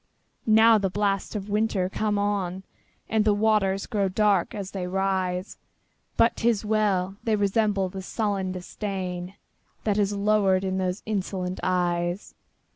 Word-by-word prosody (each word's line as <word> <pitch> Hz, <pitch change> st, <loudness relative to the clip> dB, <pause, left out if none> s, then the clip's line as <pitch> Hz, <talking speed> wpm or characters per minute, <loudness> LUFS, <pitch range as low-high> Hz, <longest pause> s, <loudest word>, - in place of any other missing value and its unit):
Now 220 Hz, 0 st, +6 dB
the 195 Hz, -1 st, 0 dB
blasts 200 Hz, +2 st, -1 dB
of 200 Hz, -2 st, -3 dB
the 205 Hz, -, -9 dB
winter 210 Hz, -3 st, +1 dB
come 210 Hz, +2 st, -1 dB
on, 195 Hz, -2 st, -1 dB, 0.4 s
And 220 Hz, -1 st, +2 dB
the 210 Hz, -1 st, +3 dB
waters 205 Hz, -2 st, +2 dB
grow 200 Hz, -4 st, 0 dB
dark 200 Hz, -2 st, +2 dB
as 200 Hz, -2 st, -5 dB
they 185 Hz, -2 st, -4 dB
rise! 185 Hz, 0 st, -1 dB, 0.6 s
But 230 Hz, -, +3 dB
't 235 Hz, -, +2 dB
is 220 Hz, -2 st, 0 dB
well!—they 210 Hz, 0 st, 0 dB
resemble 205 Hz, -1 st, +1 dB
the 190 Hz, +1 st, -7 dB
sullen 195 Hz, -1 st, -2 dB
disdainThat 185 Hz, +2 st, -5 dB
has 205 Hz, -1 st, +2 dB
lowered 200 Hz, -2 st, +2 dB
in 190 Hz, 0 st, -1 dB
those 185 Hz, +1 st, -2 dB
insolent 190 Hz, -3 st, -3 dB
eyes. 175 Hz, 0 st, -1 dB
195 Hz, 140 wpm, -26 LUFS, 185-210 Hz, 0.6 s, Now